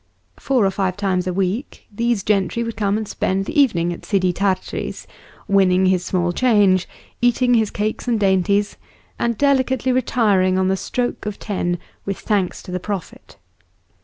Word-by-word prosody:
Four 255 -6 +2
or 195 - +2
five 190 -1 -1
times 185 -3 0
a - - 0
week 195 +8 -3
these 235 -1 0
gentry 210 +3 0
would 230 -1 -5
come 205 -1 0
and 220 -1 -4
spend 195 0 -1
the 290 - +2
evening 175 -10 +1
at - - -11
Sidi 185 -3 +1
Tart'ri's, 190 +1 -2 0.4
winning 190 -2 +3
his 185 -1 +2
small 175 -1 0
change, 200 -4 +3 0.3
eating 245 +1 +3
his 220 -3 +3
cakes 215 +3 -3
and 235 -3 +1
dainties, 200 +1 +1 0.4
and 235 -2 0
delicately 260 -2 +2
retiring 210 -7 +2
on 190 0 +2
the 190 - +2
stroke 245 +3 -3
of 210 - -4
ten 175 -4 -2 0.3
with 195 -1 -3
thanks 200 -5 -1
to - - -9
the 180 - -2
Prophet. 195 -1 -7
200 Hz, 165 wpm, -20 LUFS, 185-230 Hz, 0.4 s, winning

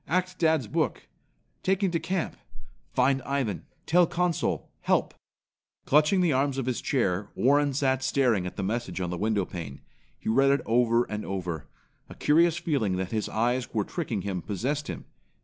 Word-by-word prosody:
Ac't 185 +2 0
dad's 160 -5 +3
book. - - -1 0.6
Taken 190 0 +1
to 165 - 0
camp. 170 +2 -2 0.6
Find 135 +1 +2
Ivan. 130 -6 -2 0.2
Tell 175 +1 +4
Consul. 175 -1 -1
Help." - - +1 0.7
Clutching 150 +6 +4
the 170 -4 +3
arms 135 +1 +1
of 135 - -1
his 125 -2 -1
chair, 100 -7 0
Warren 145 +2 +3
sat 130 -1 +1
staring 120 -9 +2
at - - -7
the 100 - -3
message 100 -3 -2
on 90 -2 -2
the - - -2
window 105 -2 +1
pane. 80 -8 -7 0.4
He - - -10
read 135 +5 +4
it 140 +1 +3
over 120 0 +3
and 105 -2 -5
over. 90 -5 -4 0.4
A - - -10
curious 165 +2 +3
feeling 130 - 0
that 95 0 -3
his 110 -2 -1
eyes 120 +2 -1
were 105 - +2
tricking 120 - -3
him 95 -3 -3
possessed 135 - -2
him. - - -6
130 Hz, 170 wpm, -27 LUFS, 105-150 Hz, 0.7 s, Tell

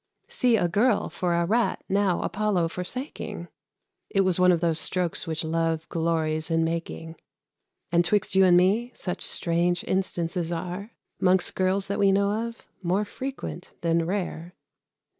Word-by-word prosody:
See 245 -2 +2
a 180 -4 +1
Girl 210 +5 +2
for 175 -2 -1
a 170 0 +1
Rat 230 +6 0
now 195 -2 +1
Apollo 200 -5 0
forsaking! 240 - -6 0.6
It 195 - +2
was 185 -2 +1
one 180 0 +6
of 175 - +2
those 165 -1 +1
strokes 180 -1 0
which 160 0 -2
Love 165 0 -1
glories 160 -1 -1
in 165 0 +2
making. 165 0 -4 0.7
And, 170 0 +4
'twixt 200 +3 +1
you 190 0 +6
and 180 -1 +6
me, 205 +7 +2
such 180 - -4
strange 175 +1 +3
instances 175 -2 -2
are, 180 +4 -4 0.3
'Mongst 185 -1 +3
girls 190 +1 0
that 200 +1 -3
we 200 -1 +4
know 200 +1 +2 0.2
of, 230 0 -11 0.2
more 190 +4 0
frequent 260 -5 -7
than 165 -1 +1
rare. 180 -2 -4
180 Hz, 155 wpm, -26 LUFS, 170-200 Hz, 0.7 s, one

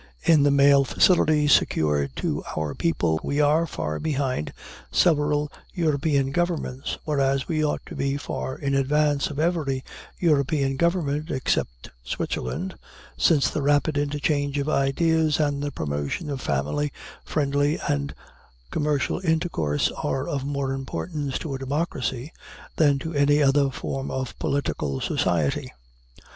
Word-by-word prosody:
In 160 -3 +5
the 145 - +4
mail 140 0 +6
facilities 150 0 +3
secured 70 -3 +2
to - - -2
our 80 -2 -1
people, 85 - 0
we 140 - -1
are 150 +3 +3
far 75 - -3
behind 135 - -1 0.4
several 150 - +2 0.2
European 145 -4 +1
governments, 165 -5 -2
whereas 135 -3 +1
we 155 -2 0
ought 150 - -1
to - - -9
be 140 0 -1
far 130 -2 -4
in 140 -1 -2
advance 145 +1 +2
of 145 - -7
every 155 -6 0 0.3
European 140 -4 +2
government 155 -1 0
except - - -2
Switzerland, 175 - -3 0.4
since 150 -5 +3
the 150 - -2
rapid 145 +2 +2
interchange 145 0 0
of 140 0 -1
ideas, 155 +2 +2
and 145 -2 +1
the 145 - -1
promotion 75 - -3
of 135 -2 -4
family, 75 - -1 0.3
friendly, 145 0 +1
and 70 -1 -1 0.6
commercial 150 0 0
intercourse, 160 - 0
are 135 +1 -2
of 140 -2 -2
more 140 -1 -2
importance 140 +1 -3
to 150 - -5
a 135 - -4
democracy 135 -1 -2 0.4
than 145 -3 +4
to 160 +4 -5
any 145 0 +3
other 140 -1 +4
form 135 0 -4
of 130 -2 -3
political 75 - -1
society. 85 -6 0
140 Hz, 135 wpm, -25 LUFS, 135-150 Hz, 0.6 s, mail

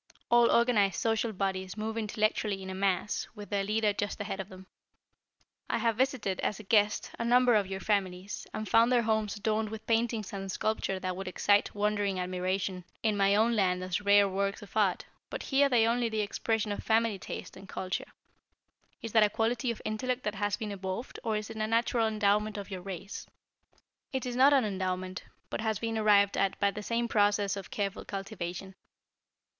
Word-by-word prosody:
All 240 0 +6
organized 235 -5 +3
social 225 -1 0
bodies 190 -1 -3
move 220 +1 -3
intellectually 215 -2 -1
in 190 - -6
a - - -4
mass, 195 +1 0
with 205 -1 -10
their 200 -1 +1
leader 210 +1 +1
just 205 +1 -3
ahead 205 -1 -4
of 195 +1 -5
them." 185 0 -12 1.0
"I - - +1
have 230 -1 +1
visited, 250 -6 0
as 210 - -1
a - - -9
guest, 210 +1 +2
a - - 0
number 245 +1 +5
of 205 -3 +3
your 190 0 -5
families, 195 -2 -2
and 215 - -4
found 230 +4 +5
their 245 -1 +4
homes 220 -1 0
adorned 215 0 -1
with 220 0 -8
paintings 225 -2 0
and 195 -1 -4
sculpture 195 -2 -1
that 185 -1 -3
would 195 +1 -6
excite 205 +3 +2
wondering 205 -2 0
admiration 185 +1 -2 0.2
in 215 -2 +2
my 200 0 +3
own 225 +3 +3
land 185 -3 +1
as 185 +2 -2
rare 200 0 +5
works 200 +2 -2
of 200 - -14
art, 200 -4 +2 0.2
but - - -5
here 280 0 +3
they 235 -4 +4
are 230 - +3
only 240 -1 0
the 220 -1 -1
expression 215 +1 -1
of 205 - -3
family 225 -2 +2
taste - - -7
and 190 0 -12
culture. 185 -1 -4 0.9
Is 225 - -4
that 220 - +5
a 210 - +5
quality 230 +4 0
of 235 - -4
intellect 250 +4 -2
that 210 - -1
has 205 0 -1
been 215 -2 -4
evolved, 195 +4 -5
or 220 -1 0
is 215 +1 -5
it 220 - -8
a 215 0 -1
natural 230 0 +2
endowment 210 0 +1
of 200 0 -7
your 185 -1 -5
race?" 195 +1 -7 0.8
"It 265 -1 -2
is 245 -1 -3
not 265 +3 +6
an 270 -5 +4
endowment, 185 -2 -3 0.3
but - - -2
has 220 -1 0
been 225 +1 -3
arrived 205 -2 +4
at 195 - 0
by 200 0 +3
the 210 - -6
same 235 +2 -1
process 205 -2 +2
of 195 -2 -7
careful 200 -2 -3
cultivation. 195 -2 -6
210 Hz, 200 wpm, -30 LUFS, 195-225 Hz, 1.0 s, All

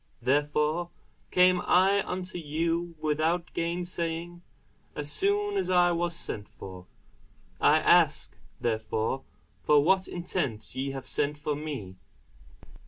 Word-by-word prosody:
Therefore 150 +6 +1 0.4
came 180 0 +4
I 195 +3 +4
unto 180 0 -3
you 165 +2 -2
without 160 +3 0
gainsaying, 170 0 -3 0.5
as 145 0 -2
soon 405 +1 +1
as 385 - -1
I 175 -1 +4
was 170 0 -1
sent 105 -10 -4
for: 95 -1 -10 0.7
I - - +5
ask - - +3 0.2
therefore 110 +2 -1 0.4
for 145 -1 +4
what 190 +3 +3
intent 170 - -3
ye 135 +1 -2
have 135 -1 -6
sent 150 0 -1
for 150 0 -2
me? 140 -12 -6
165 Hz, 115 wpm, -28 LUFS, 145-175 Hz, 0.7 s, I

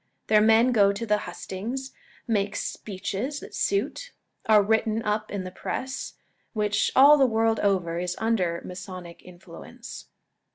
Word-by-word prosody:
Their 215 -1 +5
men 225 +3 +5
go 200 -4 +4
to 200 +3 -4
the 210 -1 +2
hustings, 245 +8 -6 0.4
make 205 -3 0
speeches 210 +8 -4
that - - -11
suit, - - -2 0.3
are 215 -2 +6
written 220 +1 +1
up 210 0 -1
in 200 -2 -4
the 185 - -7
press, 260 +7 -5 0.4
which, 210 -2 +1
all 285 +3 +8
the 265 - +5
world 225 -1 +1
over, 180 -4 0
is 180 0 -2
under 190 -7 0
Masonic 180 -1 -9
influence. 180 +7 -11
210 Hz, 140 wpm, -26 LUFS, 190-230 Hz, 0.4 s, all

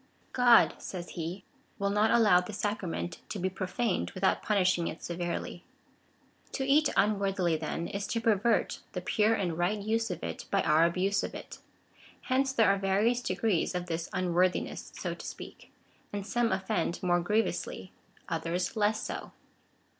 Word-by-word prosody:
" - - -33
God," 245 -2 +6
says 175 -2 -6
he, 170 +3 -5 0.2
" - - -37
will 200 0 0
not 210 +2 +3
allow 210 -6 +5
this 190 +3 -7
sacrament 170 - -3
to - - -4
be 185 +1 -1
pro 190 0 -4
faned 220 +1 -1
without 190 0 +1
punishing 185 -5 +2
it - - -6
severely.'' 175 0 -4 0.9
To 265 - -1
eat 290 +3 +4
unworthily, 195 -4 +2
then, 160 +2 -3
is 200 0 -4
to 230 - -1
pervert 225 0 +2
the - - -3
pure 220 -1 +2
and 175 -5 -2
right 180 +5 +1
use 220 +2 -1
of 180 - -5
it - - -5
by 195 - +2
our 155 +2 +4
abuse 185 +4 +1
of - - -5
it. - - -9 0.6
Hence 265 +1 +1
there 230 -6 +4
are 200 - -2
various 205 +6 +2
degrees 185 -3 0
of 180 0 -2
this 165 -1 -3
unworthiness, 180 0 0
so - - -3
to - - -10
speak; - - -9 0.4
and 205 -1 -4
some 235 +3 +1
offend 190 -2 -1
more 175 -1 +3
griev 215 +5 +2
ously, - - -5 0.4
others 180 +2 -2
less 215 0 +1
so. - - -6
195 Hz, 170 wpm, -30 LUFS, 175-220 Hz, 0.9 s, God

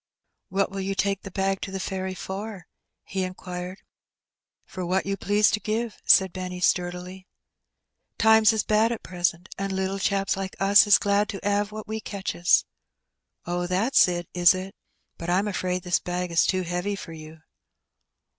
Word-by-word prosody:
"What 195 +1 0
will 195 - -5
you 195 +1 -2
take 195 +1 0
the 195 - -8
bag 195 0 -1
to - - -4
the 190 0 -5
ferry 190 0 -4
for?" 195 0 -6 0.4
he 190 - -4
inquired. 185 0 -6 0.8
"For 185 - -6
what 185 +2 0
you 195 0 -1
please 205 +1 +2
to 215 - 0
give," 220 +1 -3
said 190 -2 +5
Benny 180 -1 -5
sturdily. 180 +1 -1 0.9
''Times 220 0 +6
is 220 -2 0
bad 220 +2 +2
at 235 - -4
present, 175 -1 -2
and 195 0 -2
little 190 +1 -2
chaps 195 0 0
like 190 -1 -5
us 200 +2 +6
is 205 - +7
glad 205 0 +1
to 200 0 -4
*ave 205 0 +1
what 215 0 -8
we 220 +1 -3
catches." 190 -4 +1 0.8
"Oh, 175 +1 -2
that's 195 +7 +4
it, 175 -2 -3
is 175 0 +5
it? 190 +1 -6 0.5
But 170 - -5
Fm 190 +4 +2
afraid 185 -2 -2
this 180 -1 +1
bag 180 0 -3
is 165 - +3
too 185 -1 +1
heavy 180 +4 -2
for 170 -4 -9
you." 155 0 -11
190 Hz, 175 wpm, -25 LUFS, 180-200 Hz, 0.9 s, is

